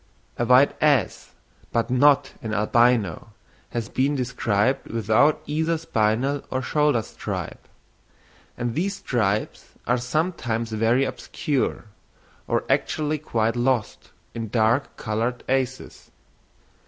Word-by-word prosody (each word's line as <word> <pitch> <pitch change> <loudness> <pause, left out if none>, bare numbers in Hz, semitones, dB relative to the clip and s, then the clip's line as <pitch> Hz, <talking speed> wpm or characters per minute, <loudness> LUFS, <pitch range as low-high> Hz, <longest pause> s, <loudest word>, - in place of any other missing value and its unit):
A 120 - 0
white 125 +3 +5
ass, 145 - +1 0.4
but 115 +1 0
not 140 +1 +4
an 110 -2 -3
albino, 110 -4 +2 0.4
has 115 -3 -3
been 140 +3 0
described 125 -2 0
without 115 +7 +2
either 160 +3 0
spinal 130 -1 0
or 130 0 -2
shoulder 150 -3 +2
stripe; - - -6 0.9
and 120 -1 -2
these 195 +8 -1
stripes 110 - -2
are 125 +1 +1
sometimes 125 -5 -2
very 115 +5 +2
obscure, 140 -4 -2 0.6
or - - 0
actually 155 0 0
quite 115 -5 -1
lost, 120 -2 -1 0.2
in 115 -1 -4
dark 115 +4 +1
coloured 115 +3 -2
asses. 130 -1 -2
125 Hz, 110 wpm, -24 LUFS, 115-140 Hz, 0.9 s, white